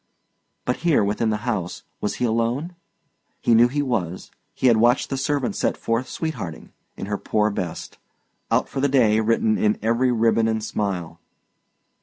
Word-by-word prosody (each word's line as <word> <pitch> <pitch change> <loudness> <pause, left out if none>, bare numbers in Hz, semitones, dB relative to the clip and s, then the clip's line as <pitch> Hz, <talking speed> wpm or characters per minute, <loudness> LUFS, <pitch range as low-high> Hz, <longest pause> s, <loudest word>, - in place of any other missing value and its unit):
But 125 - 0
here, 165 -9 +2
within 105 +2 0
the 105 +2 -2
house, 95 -8 -3 0.2
was 105 - -2
he 125 - -1
alone? 120 +9 -1 0.6
He 120 - +2
knew 115 +2 +6
he 145 +3 -1
was; 95 - -3 0.2
he - - -3
had 120 -3 +6
watched 120 +5 +3
the - - 0
servant 135 0 -1
set - - 0
forth 115 +3 -1
sweet 160 -1 -3
hearting, 80 - -7 0.3
in - - -5
her 105 0 -3
poor 105 0 +1
best, 90 -5 -5 0.5
"out - - +2
for 135 - -5
the 140 - +2
day" 115 -5 +4
written 110 -1 +2
in 105 0 +2
every 115 +3 +2
ribbon 115 -1 +2
and 110 -1 -1
smile. 90 -6 -3
115 Hz, 175 wpm, -23 LUFS, 105-125 Hz, 0.6 s, knew